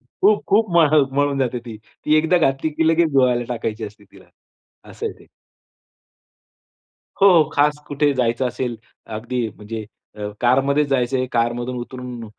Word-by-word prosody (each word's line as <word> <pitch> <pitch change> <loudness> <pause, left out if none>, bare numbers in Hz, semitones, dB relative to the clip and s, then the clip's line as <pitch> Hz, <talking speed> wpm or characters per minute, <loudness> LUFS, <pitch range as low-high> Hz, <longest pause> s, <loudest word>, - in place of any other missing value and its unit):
खूप, 200 +12 +1
खूप 215 +3 +3
म्ह 155 -2 +5
मळून 145 -1 +1
जाते 130 -2 -1
ती. 115 -2 -7 0.3
ती 155 - +3
एकदा 160 +3 +3
घातली 135 0 +1
की 160 +2 +1
लगेच 165 0 +3
धुवायला 125 -3 +3
टाकायची 110 -2 -3
असते 105 0 -11
तिला, 100 - -19 0.6
असं - - -5
आहे - - -3
ते. - - -18 1.9
हो, 200 - +7 0.2
हो. - - -11
खास 150 +1 +2
कुठे 145 0 +1
जायचं 125 0 0
असेल. 125 -2 -4 0.3
अगदी 115 +2 -3
म्हणजे 110 +1 -7 0.3
अ, 105 - -6 0.2
कारमध्येच 135 +4 +2
जायच 130 -2 0
आहे, 130 0 0
कारमधून 120 +2 -1
उतरून 125 -1 -7
130 Hz, 155 wpm, -21 LUFS, 120-150 Hz, 1.9 s, हो